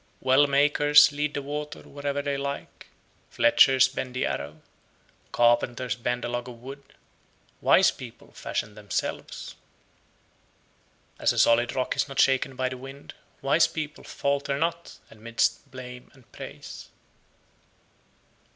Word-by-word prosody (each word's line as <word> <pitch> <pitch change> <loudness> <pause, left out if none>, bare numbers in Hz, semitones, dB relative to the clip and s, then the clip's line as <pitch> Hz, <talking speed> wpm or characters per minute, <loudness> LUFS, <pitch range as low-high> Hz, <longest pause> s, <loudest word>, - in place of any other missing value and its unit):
80. - - -26
Well 135 +2 +5
makers 145 +1 +5
lead 150 +1 -2
the 140 - -3
water 150 +1 -5
(wherever 145 0 -4
they 140 -1 -1
like); 140 0 -6 0.4
fletchers 135 - +5
bend 130 -1 -6
the 125 - 0
arrow; 75 +3 -5 0.7
carpenters 120 +1 +2
bend 120 0 -2
a - - -2
log 120 +1 -4
of 120 -1 -11
wood; 135 +3 -9 0.8
wise - - +5
people - - -12
fashion 105 - -4
themselves. 105 -1 -5 1.6
81. - - -13
As - - +5
a - - -7
solid 120 +1 +3
rock 130 - -1
is - - 0
not 135 -1 -6
shaken 135 0 +3
by 130 0 -1
the 130 0 -5
wind, 135 +2 -10 0.3
wise 155 +4 +4
people 155 -1 -6
falter 140 0 -2
not 170 +2 -3
amidst 115 +5 -1
blame 125 -1 -10
and 130 -4 -22
praise. - - -10
135 Hz, 135 wpm, -26 LUFS, 125-145 Hz, 1.6 s, Well